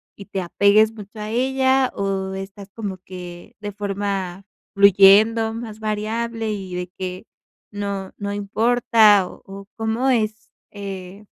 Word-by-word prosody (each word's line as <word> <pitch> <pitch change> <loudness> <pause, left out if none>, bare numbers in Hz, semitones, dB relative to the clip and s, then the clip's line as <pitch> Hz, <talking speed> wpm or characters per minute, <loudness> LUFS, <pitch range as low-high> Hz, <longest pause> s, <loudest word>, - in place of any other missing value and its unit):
y 200 - -11
te 195 -2 -3
apegues 200 +5 +4
mucho 210 0 -11
a 210 0 -5
ella, 265 +1 +2
o 195 -1 -2
estás 195 +1 -8
como 205 -4 -5
que 180 -1 -10
de 205 -1 -6
forma 195 -2 -3 0.3
fluyendo, 200 +3 +6
más 220 -2 -7
variable, 220 +1 -2
y 190 -3 -6
de 180 0 -3
que 185 +2 -5 0.5
no 200 -2 -4
no 200 -1 -4
importa, 215 -1 +4
o - - -13
o 195 0 -10
cómo 225 +4 0
es, 215 -3 0 0.2
eh, 195 0 -8
205 Hz, 135 wpm, -22 LUFS, 195-220 Hz, 0.5 s, fluyendo